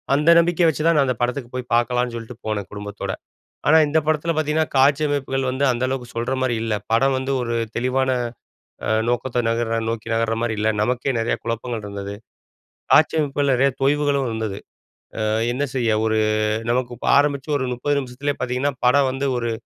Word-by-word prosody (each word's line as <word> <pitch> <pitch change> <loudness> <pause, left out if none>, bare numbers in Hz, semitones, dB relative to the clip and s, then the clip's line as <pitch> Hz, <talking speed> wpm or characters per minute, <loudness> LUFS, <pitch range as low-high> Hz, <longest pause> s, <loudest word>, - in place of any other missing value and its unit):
அந்த 150 +3 +2
நம்பிக்கையை 170 0 +3
வச்சுதான் 160 +2 +1
நான் 140 - +4
அந்த 125 -3 -1
படத்துக்கு 120 0 -2
போய் 125 -1 -5
பார்க்கலாம்னு 120 0 +1
சொல்ட்டு 115 +1 -8
போனேன் 105 -3 -3
குடும்பத்தோட. 105 -1 -5 0.6
ஆனா 160 +2 +7
இந்த 155 - +1
படத்தில 155 +2 +1
பார்த்தீங்கன்னா 155 +1 +1
காட்சி 140 +3 +4
அமைப்புகள் 135 -2 -1
வந்து 135 +2 -2
அந்த 120 +2 -3
அளவுக்கு 130 -2 -4
சொல்ற 120 +3 -1
மாரி 120 -2 +1
இல்ல. 115 -1 -1 0.2
படம் 135 +3 +3
வந்து 130 +1 -3
ஒரு 115 0 -2 0.2
தெளிவான 130 +2 +1 0.8
அ - - 0 0.2
நோக்கத்தை 120 0 0
நகர்ற 115 0 0
நோக்கி 115 0 -4
நகர்ற 115 0 +1
மாரி 115 -2 0
இல்ல. 110 +1 +1
நமக்கே 125 +4 0
நிறைய 115 +1 0
குழப்பங்கள் 115 -1 -3
இருந்தது. 100 0 -6 0.8
காட்சி - - +5
அமைப்பில 140 -2 0
நிறைய 135 +2 +3
தொய்வுகளும் 140 -1 +2
இருந்தது. 110 -3 -3 0.7
அ - - 0 0.3
என்ன 135 +4 -1
செய்ய 115 -4 +1
ஒரு 110 0 +1 0.5
நமக்கு 125 0 -1
இப்போ - - -6
ஆரம்பிச்சு 145 0 +1
ஒரு 130 - -2
30 145 +4 -1
நிமிசத்திலயே 135 +2 -4
பார்த்தீங்கன்னா 125 +3 -1
படம் 135 +1 +4
வந்து, 135 +1 -2
ஒரு 120 -1 -1
125 Hz, 175 wpm, -22 LUFS, 115-140 Hz, 0.8 s, ஆனா